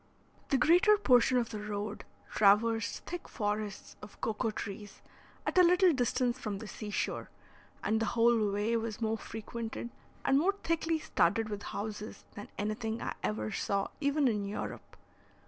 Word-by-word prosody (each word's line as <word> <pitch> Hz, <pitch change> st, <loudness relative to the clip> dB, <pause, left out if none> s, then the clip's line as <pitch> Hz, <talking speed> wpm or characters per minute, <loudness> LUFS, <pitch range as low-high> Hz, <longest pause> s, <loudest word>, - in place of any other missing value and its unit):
The 275 Hz, -, +3 dB
greater 355 Hz, -, +5 dB
portion 255 Hz, -, +4 dB
of 235 Hz, -2 st, 0 dB
the 215 Hz, -, -4 dB
road 210 Hz, 0 st, -4 dB, 0.3 s
traversed 215 Hz, +2 st, +3 dB
thick 350 Hz, 0 st, -6 dB
forests 210 Hz, -2 st, -3 dB
of 210 Hz, -, -12 dB
cocoa 225 Hz, 0 st, -1 dB
trees, 205 Hz, -1 st, -6 dB, 0.5 s
at -, -, +2 dB
a -, -, +9 dB
little 360 Hz, 0 st, +5 dB
distance 250 Hz, -1 st, +1 dB
from 210 Hz, -5 st, -3 dB
the 220 Hz, -, -8 dB
sea 210 Hz, 0 st, -7 dB
shore, -, -, -2 dB, 0.5 s
and 220 Hz, +1 st, +1 dB
the 225 Hz, -, 0 dB
whole 230 Hz, -3 st, +4 dB
way 210 Hz, +3 st, 0 dB
was 225 Hz, -2 st, -4 dB
more 225 Hz, -1 st, -1 dB
frequented 230 Hz, +1 st, -6 dB, 0.3 s
and 270 Hz, -, +4 dB
more 390 Hz, +6 st, +2 dB
thickly 330 Hz, 0 st, +1 dB
studded 220 Hz, -, +1 dB
with 205 Hz, -1 st, -4 dB
houses 210 Hz, +1 st, -6 dB
than 205 Hz, -, -9 dB
anything 220 Hz, +2 st, -2 dB
I -, -, -3 dB
ever 110 Hz, 0 st, -2 dB
saw 200 Hz, -1 st, -1 dB
even 285 Hz, -1 st, +2 dB
in 210 Hz, -4 st, 0 dB
Europe. 200 Hz, +1 st, -6 dB
225 Hz, 160 wpm, -32 LUFS, 210-255 Hz, 0.5 s, a